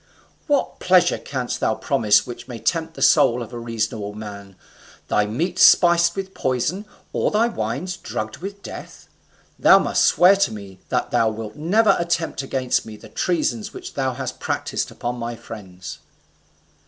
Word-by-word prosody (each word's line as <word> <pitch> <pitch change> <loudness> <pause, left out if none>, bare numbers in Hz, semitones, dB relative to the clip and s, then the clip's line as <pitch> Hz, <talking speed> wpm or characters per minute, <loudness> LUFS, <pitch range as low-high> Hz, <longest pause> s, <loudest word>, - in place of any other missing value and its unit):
What 290 -3 0
pleasure 185 -1 +3
canst 130 -3 -4
thou 110 - +1
promise 105 -6 +2
which 120 -1 -9
may 120 -3 -7
tempt 160 +8 -1
the - - -2
soul 125 -5 +4
of 115 - -11
a 120 - -5
reasonable 110 -2 -3
man? 100 -2 -9 0.5
Thy 105 0 +2
meats, 170 - -2
spiced 170 -1 +6
with 195 -1 -5
poison; 145 - -1 0.3
or - - +1
thy 215 +2 +2
wines, 185 -5 -3
drugged 110 0 -5
with 200 +2 -8
death? - - -10 0.5
Thou - - +7
must - - +1
swear 180 +3 +6
to 195 -12 +1
me 100 -3 -10
that - - -1
thou 110 - +3
wilt 110 0 -7
never 200 +8 +3
attempt 170 -3 -1
against 130 -2 -1
me 110 -1 -10
the - - -14
treasons 140 -11 -1
which - - -8
thou 130 -2 -1
hast 130 -1 -5
practised - - -2
upon 120 +1 -4
my 120 0 -4
friends." 95 -5 -10
130 Hz, 165 wpm, -22 LUFS, 110-175 Hz, 0.5 s, Thou